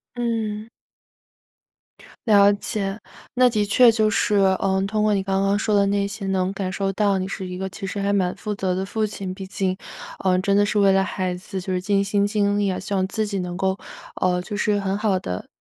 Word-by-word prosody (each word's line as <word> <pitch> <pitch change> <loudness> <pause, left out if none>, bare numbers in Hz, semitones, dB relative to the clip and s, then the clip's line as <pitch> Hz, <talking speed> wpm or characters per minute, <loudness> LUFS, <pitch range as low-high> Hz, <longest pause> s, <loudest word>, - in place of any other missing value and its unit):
嗯。 225 -2 -2 1.6
了 205 -1 +6
解， 200 0 -3 0.3
那 250 0 +5
的 215 -3 0
确 235 +4 +6
就 220 -1 +2
是， 210 0 +1
呃， 190 0 +2
通 215 +1 -1
过 215 -1 +3
你 195 - 0
刚 195 0 0
刚 200 +1 +2
说 215 -1 0
的 200 0 +4
那 200 0 +1
些 200 0 -6
能 190 0 0
感 190 -2 -3
受 195 +1 -1
到 200 0 +1
你 185 0 -2
是 190 -1 -5
一 180 0 -6
个 190 - -3
其 195 - -7
实 195 - -5
还 200 0 0
蛮 185 -3 0
负 210 -1 -4
责 190 -2 -1
的 190 +1 -2
父 215 +2 -1
亲， 195 -2 -5
毕 190 0 -8
竟， 190 -1 -1 0.5
呃， 185 -1 +3
真 195 +1 +1
的 205 +1 +4
是 210 +1 0
为 195 -1 +5
了 195 0 +3
孩 185 -1 -2
子 190 +1 -7 0.2
尽 200 +1 +1
心 200 0 +1
尽 205 -1 +1
力， 195 -3 0
希 195 - -7
望 190 -1 +1
自 215 +1 -1
己 200 -1 -3
能 180 -1 -4
够， 190 0 0 0.4
呃， 180 -1 +1
就 205 - -7
是 210 -1 +1
很 195 0 -1
好 205 -3 +1
地 90 - -5
200 Hz, 235 characters per minute, -23 LUFS, 190-210 Hz, 1.6 s, 了